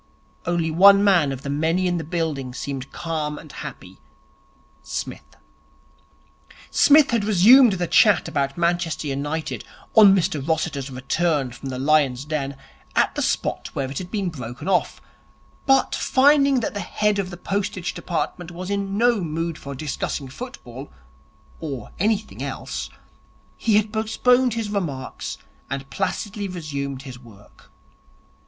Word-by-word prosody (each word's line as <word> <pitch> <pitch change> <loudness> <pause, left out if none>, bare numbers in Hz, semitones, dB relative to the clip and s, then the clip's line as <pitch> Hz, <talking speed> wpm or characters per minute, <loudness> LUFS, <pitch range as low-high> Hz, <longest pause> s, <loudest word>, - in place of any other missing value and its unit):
Only 170 -2 0
one 200 +4 +7
man 175 -8 +4
of 135 0 -6
the 140 - -4
many 160 +5 +1
in 175 -1 +1
the - - -4
building 155 -7 -3
seemed 140 -1 -5
calm 155 -3 -3
and - - -11
happy - - -9 0.8
Psmith. - - -6 1.4
Psmith 295 -1 +6
had 230 -3 +1
resumed 215 +4 +7
the 180 -2 -1
chat 205 +3 +4
about 140 0 -1
Manchester 170 -2 0
United, 145 +3 -3 0.3
on 205 -3 +8
Mr 160 -6 0
Rossiter's 145 -2 -2
return 135 +1 0
from 135 +3 -8
the 130 - -4
lion's 140 -2 +2
den, 140 -3 -3 0.4
at - - +3
the - - -2
spot - - -1
where 135 -1 -3
it 135 - -4
had 180 - -7
been 200 -3 -1
broken 125 -2 -7
off; 190 -2 0 0.6
but, 270 -1 +4
finding 275 -1 +4
that - - -3
the 205 - -4
head 210 0 0
of 190 -2 -2
the 175 - -8
Postage 190 -1 -2
Department 175 0 -3
was 180 +3 -6
in 200 0 -2
no 235 -2 +3
mood 165 +1 -2
for 140 -2 -8
discussing 140 0 -3
football 135 - -9 0.7
(or 140 -6 -6
any 215 +3 +3
thing 215 +1 -12
else), - - -5 0.7
he 220 -3 +1
had 210 +1 0
postponed 245 +3 +2
his 220 -3 -3
remarks 150 -11 -4 0.3
and 135 0 -5
placidly 200 +1 -3
resumed 140 -7 -5
his 130 -3 -9
work. 110 -4 -18
170 Hz, 145 wpm, -23 LUFS, 140-205 Hz, 1.4 s, on